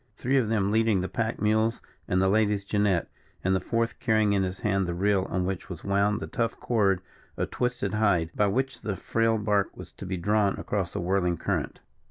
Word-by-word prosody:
Three 135 Hz, +2 st, +1 dB
of 120 Hz, -5 st, +2 dB
them 100 Hz, -3 st, +1 dB
leading 110 Hz, -3 st, +3 dB
the 95 Hz, -, -2 dB
pack 115 Hz, +2 st, -2 dB
mules 110 Hz, +2 st, +2 dB, 0.3 s
and 90 Hz, -, +1 dB
the 95 Hz, -, +3 dB
lady's 105 Hz, 0 st, +2 dB
jinnet, 100 Hz, -4 st, +1 dB, 0.4 s
and 95 Hz, +1 st, +2 dB
the -, -, +2 dB
fourth 115 Hz, +5 st, -1 dB
carrying 110 Hz, -2 st, +2 dB
in 100 Hz, -, +2 dB
his 95 Hz, 0 st, -3 dB
hand 95 Hz, -3 st, +1 dB
the 85 Hz, -, -2 dB
reel 95 Hz, +1 st, +1 dB
on 90 Hz, -1 st, -1 dB
which 95 Hz, -1 st, -4 dB
was 90 Hz, -4 st, -7 dB
wound 100 Hz, +2 st, +1 dB
the -, -, -3 dB
tough 115 Hz, -1 st, -2 dB
cord 100 Hz, -6 st, +2 dB, 0.4 s
of -, -, -2 dB
twisted 125 Hz, -5 st, -1 dB
hide, 100 Hz, -7 st, +2 dB
by 105 Hz, -, +3 dB
which 130 Hz, +6 st, -1 dB
the 105 Hz, -3 st, -2 dB
frail 115 Hz, +3 st, +1 dB
bark 105 Hz, -2 st, 0 dB
was -, -, -10 dB
to 95 Hz, -, -9 dB
be 95 Hz, 0 st, -2 dB
drawn 100 Hz, +2 st, +1 dB
across 95 Hz, -4 st, -2 dB
the -, -, -2 dB
whirling 90 Hz, -1 st, +1 dB
current. -, -, -2 dB
100 Hz, 215 wpm, -27 LUFS, 95-110 Hz, 0.4 s, leading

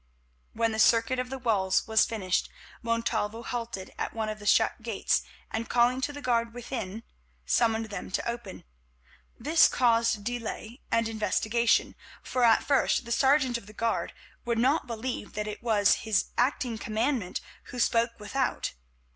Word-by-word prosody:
When 230 Hz, 0 st, +1 dB
the 220 Hz, -, -3 dB
circuit 230 Hz, +3 st, +4 dB
of 250 Hz, 0 st, -2 dB
the 265 Hz, -, -4 dB
walls 200 Hz, -7 st, +1 dB
was 220 Hz, -1 st, +4 dB
finished, 190 Hz, -6 st, -1 dB, 0.3 s
Montalvo 230 Hz, -1 st, -1 dB
halted 230 Hz, -6 st, -5 dB
at -, -, -3 dB
one 220 Hz, -1 st, -2 dB
of 215 Hz, 0 st, -5 dB
the 205 Hz, -, -7 dB
shut 225 Hz, +2 st, +3 dB
gates, 225 Hz, -3 st, 0 dB, 0.3 s
and, 225 Hz, +1 st, -3 dB
calling 245 Hz, +2 st, +3 dB
to 265 Hz, -, -1 dB
the 290 Hz, 0 st, -9 dB
guard 235 Hz, -1 st, 0 dB
within, 230 Hz, -4 st, -5 dB, 0.4 s
summoned 220 Hz, -, +1 dB
them 200 Hz, -, -5 dB
to 190 Hz, -, -2 dB
open. 235 Hz, -5 st, -5 dB, 0.8 s
This 315 Hz, +7 st, +5 dB
caused 230 Hz, -3 st, +2 dB
delay 235 Hz, +1 st, -5 dB
and 230 Hz, 0 st, +2 dB
investigation, 220 Hz, +2 st, +1 dB, 0.3 s
for 255 Hz, -, -1 dB
at 230 Hz, -2 st, +5 dB
first 275 Hz, -3 st, +2 dB
the 235 Hz, -, -7 dB
sergeant 265 Hz, -1 st, +3 dB
of 200 Hz, -, -18 dB
the 215 Hz, -, -12 dB
guard 230 Hz, +1 st, -1 dB, 0.3 s
would 235 Hz, -2 st, -1 dB
not 265 Hz, +7 st, +2 dB
believe 235 Hz, -1 st, -4 dB
that 210 Hz, 0 st, -3 dB
it 210 Hz, -1 st, -6 dB
was 215 Hz, -4 st, +3 dB
his 215 Hz, -3 st, 0 dB
acting 245 Hz, -2 st, 0 dB
commandant 220 Hz, -2 st, -1 dB, 0.3 s
who 250 Hz, -, -9 dB
spoke 235 Hz, -1 st, +2 dB
without. 250 Hz, +6 st, -2 dB
230 Hz, 160 wpm, -28 LUFS, 220-245 Hz, 0.8 s, This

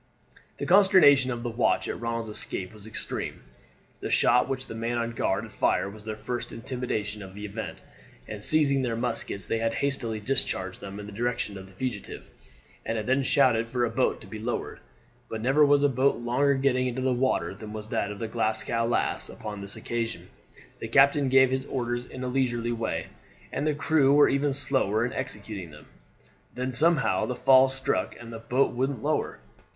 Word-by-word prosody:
The -, -, -3 dB
consternation 180 Hz, -9 st, +6 dB
of 120 Hz, -2 st, -3 dB
the 120 Hz, -, -2 dB
watch 115 Hz, +1 st, +1 dB
at -, -, -5 dB
Ronald's 115 Hz, -1 st, -2 dB
escape 90 Hz, +2 st, -4 dB
was 105 Hz, 0 st, -10 dB
extreme. 110 Hz, -, -5 dB, 0.6 s
The -, -, -4 dB
shot 125 Hz, -, +4 dB
which 130 Hz, -1 st, -2 dB
the -, -, -8 dB
man 115 Hz, +1 st, -2 dB
on 115 Hz, 0 st, -1 dB
guard 115 Hz, -, -1 dB
had -, -, -11 dB
fired 100 Hz, -, +1 dB
was 105 Hz, -1 st, -13 dB
their 110 Hz, -1 st, -4 dB
first 120 Hz, +3 st, -5 dB
intimation 115 Hz, -4 st, -4 dB
of 95 Hz, -1 st, -10 dB
the 105 Hz, +1 st, -6 dB
event, 105 Hz, +2 st, -6 dB, 0.5 s
and 105 Hz, -1 st, -7 dB
seizing 140 Hz, +1 st, +3 dB
their 120 Hz, -3 st, -1 dB
muskets 115 Hz, -4 st, -3 dB
they 115 Hz, -, -1 dB
had 115 Hz, 0 st, 0 dB
hastily 130 Hz, -6 st, -1 dB
discharged 105 Hz, -6 st, -2 dB
them 100 Hz, +1 st, -7 dB
in 105 Hz, -, -7 dB
the 105 Hz, -, -9 dB
direction 115 Hz, -1 st, -2 dB
of 95 Hz, 0 st, -9 dB
the -, -, -16 dB
fugitive, 115 Hz, 0 st, -5 dB, 0.6 s
and 115 Hz, -, -2 dB
had 110 Hz, -, -3 dB
then 130 Hz, +2 st, +2 dB
shouted 115 Hz, -3 st, +3 dB
for 120 Hz, +1 st, 0 dB
a 115 Hz, -, -3 dB
boat 125 Hz, +3 st, +1 dB
to -, -, -11 dB
be 110 Hz, -, -8 dB
lowered. 120 Hz, +2 st, -4 dB, 0.5 s
But 110 Hz, -, -4 dB
never 135 Hz, +5 st, +4 dB
was 145 Hz, 0 st, +5 dB
a -, -, +6 dB
boat 135 Hz, +1 st, +2 dB
longer 130 Hz, +4 st, +1 dB
getting 130 Hz, -1 st, +1 dB
into 130 Hz, +1 st, -3 dB
the 130 Hz, -1 st, +2 dB
water 130 Hz, -3 st, 0 dB
than 105 Hz, +2 st, -9 dB
was 110 Hz, 0 st, -7 dB
that 110 Hz, -3 st, -1 dB
of 105 Hz, -, -6 dB
the 115 Hz, -, -4 dB
Glasgow 115 Hz, +1 st, 0 dB
Lass 120 Hz, -, 0 dB
upon 105 Hz, -2 st, -7 dB
this 100 Hz, 0 st, -2 dB
occasion. 115 Hz, -1 st, -4 dB, 0.5 s
The -, -, -5 dB
captain 140 Hz, +3 st, +4 dB
gave 130 Hz, 0 st, +5 dB
his 130 Hz, 0 st, -1 dB
orders 120 Hz, -2 st, -3 dB
in 130 Hz, -, -7 dB
a -, -, -2 dB
leisurely 120 Hz, -2 st, 0 dB
way, 115 Hz, -1 st, -2 dB, 0.5 s
and 145 Hz, -, -1 dB
the 150 Hz, -, +1 dB
crew 145 Hz, -2 st, +3 dB
were 145 Hz, -, +6 dB
even 140 Hz, +1 st, +1 dB
slower 130 Hz, -6 st, +1 dB
in 125 Hz, -, -4 dB
executing 105 Hz, -7 st, -5 dB
them. 75 Hz, 0 st, -14 dB, 0.7 s
Then 125 Hz, +1 st, -2 dB
somehow 155 Hz, +2 st, +2 dB
the 125 Hz, -, -2 dB
fall 130 Hz, +1 st, +6 dB
stuck 135 Hz, +1 st, -1 dB
and 115 Hz, -1 st, -9 dB
the 115 Hz, -, -6 dB
boat 125 Hz, +4 st, +1 dB
wouldn't 130 Hz, -1 st, -2 dB
lower. -, -, -1 dB
120 Hz, 200 wpm, -27 LUFS, 110-135 Hz, 0.7 s, consternation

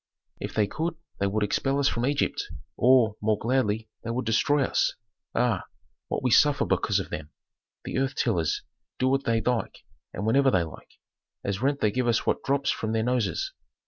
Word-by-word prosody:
"If -, -, -5 dB
they 105 Hz, -, +3 dB
could 160 Hz, +10 st, -3 dB, 0.2 s
they 100 Hz, -, +2 dB
would 105 Hz, +2 st, 0 dB
expel 135 Hz, +6 st, 0 dB
us 140 Hz, -1 st, +3 dB
from 120 Hz, -1 st, 0 dB
Egypt, 145 Hz, 0 st, 0 dB, 0.3 s
or, 120 Hz, -3 st, +4 dB
more 105 Hz, 0 st, +2 dB
gladly, 110 Hz, -2 st, 0 dB, 0.2 s
they -, -, -5 dB
would 120 Hz, +2 st, -2 dB
destroy 135 Hz, +6 st, +3 dB
us. -, -, +1 dB, 0.4 s
Ah, 120 Hz, -5 st, +1 dB, 0.4 s
what -, -, -2 dB
we 125 Hz, -, +2 dB
suffer 145 Hz, +5 st, +5 dB
because -, -, +1 dB
of -, -, -6 dB
them. 75 Hz, -1 st, -5 dB, 0.6 s
The -, -, -2 dB
earth 135 Hz, 0 st, 0 dB
tillers 85 Hz, -10 st, 0 dB, 0.3 s
do 130 Hz, -, +1 dB
what 135 Hz, +1 st, +1 dB
they 115 Hz, -1 st, +2 dB
like 125 Hz, -1 st, -2 dB, 0.3 s
and 100 Hz, -, -4 dB
whenever 135 Hz, +5 st, +4 dB
they 95 Hz, -7 st, +3 dB
like. 80 Hz, -, -10 dB, 0.5 s
As 100 Hz, +1 st, -2 dB
rent 140 Hz, +2 st, +1 dB
they 105 Hz, -, +3 dB
give 125 Hz, +1 st, 0 dB
us 115 Hz, -1 st, +2 dB
what -, -, +1 dB
drops 140 Hz, 0 st, +1 dB
from 110 Hz, 0 st, -2 dB
their 110 Hz, 0 st, +1 dB
noses. 120 Hz, -7 st, 0 dB
120 Hz, 190 wpm, -27 LUFS, 105-135 Hz, 0.6 s, suffer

